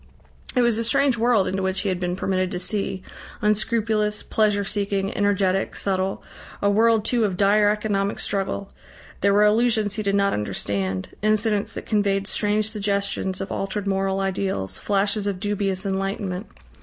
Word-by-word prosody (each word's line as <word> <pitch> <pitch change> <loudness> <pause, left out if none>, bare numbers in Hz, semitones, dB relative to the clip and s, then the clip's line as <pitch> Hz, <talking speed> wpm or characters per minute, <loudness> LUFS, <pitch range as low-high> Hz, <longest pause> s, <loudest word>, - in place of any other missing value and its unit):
It 250 - +4
was 235 -2 +2
a - - 0
strange 275 +2 +3
world 230 -4 +2
into 190 +1 -1
which 190 0 0
he 200 - -1
had 185 -1 -1
been 180 -1 -1
permitted 185 0 0
to 180 - -4
see, 190 0 -2 0.4
unscrupulous, 210 0 +1
pleasure 210 -2 +1
seeking, 200 -1 -1
energetic, 195 -2 +1
subtle, 190 0 -1 0.4
a 200 - +2
world 220 +1 +3
too 240 -1 +2
of 190 -4 0
dire 205 +1 +4
economic 205 -1 -1
struggle; 195 0 -2 0.5
there 200 - +3
were 205 +1 +5
allusions 215 -1 +2
he - - 0
did 200 -1 0
not 200 0 +2
understand, 95 -2 -2
incidents 215 -1 +1
that - - -6
conveyed 200 -2 +1
strange 210 +1 0
suggestions 200 -2 -1
of 195 - -5
altered 195 +1 -3
moral 195 0 0
ideals, 190 - -2
flashes 205 +1 0
of 195 -2 -2
dubious 200 -1 -1
enlightenment. 195 0 -2
200 Hz, 160 wpm, -23 LUFS, 195-210 Hz, 0.5 s, were